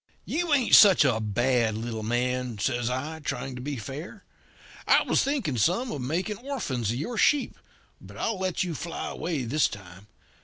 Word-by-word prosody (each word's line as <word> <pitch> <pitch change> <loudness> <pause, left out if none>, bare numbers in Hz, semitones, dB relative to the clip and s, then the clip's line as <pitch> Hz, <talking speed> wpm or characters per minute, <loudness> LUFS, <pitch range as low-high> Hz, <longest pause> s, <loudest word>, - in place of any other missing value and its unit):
"'You 345 0 -2
ain't 270 -5 +2
such 195 -8 +8
a 120 -5 +2
bad 115 +1 +1
little 115 -1 -4
man,' 125 +1 -1
says 120 +2 -1
I, 145 +6 -4
trying 135 -3 -4
to 125 - -7
be 145 +2 -4
fair. 145 - -8 0.6
'I - - +5
was - - +2
thinking 255 - -1
some 195 - +1
of 140 - -4
making 175 - -2
orphans 225 - -3
of 115 - -1
your 215 - -3
sheep, 290 -2 +2 0.5
but - - -13
I'll 225 -4 -2
let 185 -1 -1
you 175 -2 -3
fly 165 +2 -5
away 160 -4 -3
this 140 +6 +2
time. 95 0 -11
135 Hz, 180 wpm, -26 LUFS, 120-190 Hz, 0.6 s, such